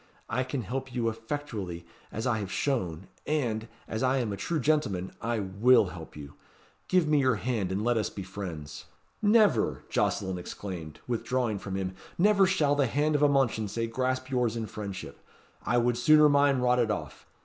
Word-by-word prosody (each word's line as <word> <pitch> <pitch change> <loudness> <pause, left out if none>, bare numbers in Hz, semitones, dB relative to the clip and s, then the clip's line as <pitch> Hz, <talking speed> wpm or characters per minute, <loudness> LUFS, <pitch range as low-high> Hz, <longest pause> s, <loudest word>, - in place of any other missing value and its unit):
I 130 - 0
can 130 -1 -3
help 130 +5 -4
you 115 -2 +1
effectually, 110 - -5 0.3
as 110 - -4
I 120 -3 +1
have 100 -2 -5
shown; 95 - -1 0.2
and, 120 -7 -1 0.2
as 110 - -3
I 130 +1 +2
am 115 -5 -1
a - - -2
true 160 +10 -2
gentleman, 120 -11 0
I 115 +1 -1
will 105 +2 +4
help 80 -3 -10
you. 70 -1 -9 0.5
Give 180 -4 +3
me 150 -1 +4
your 130 -3 +3
hand, 110 -4 -2
and 100 +3 -1
let 120 0 +2
us 110 - 0
be 100 - -7
friends!" 90 -6 -7 0.4
"Never!" 210 - +3
Jocelyn 95 -2 0
exclaimed, 85 -4 -7
withdrawing 120 -2 -1
from 95 -1 -5
him, 95 -1 -2 0.2
"never 200 +1 +5
shall 155 -6 +2
the 145 -2 +2
hand 150 +5 +1
of 145 - +1
a 145 - +5
Mounchensey 115 -5 +1
grasp 130 +3 -2
yours 120 -3 +1
in 115 -1 -2
friendship! 100 -3 -7 0.4
I 120 +3 +1
would 120 0 +2
sooner 150 +4 +7
mine 140 -1 +4
rotted 125 -2 +3
off! 105 - -5
120 Hz, 180 wpm, -28 LUFS, 100-135 Hz, 0.5 s, sooner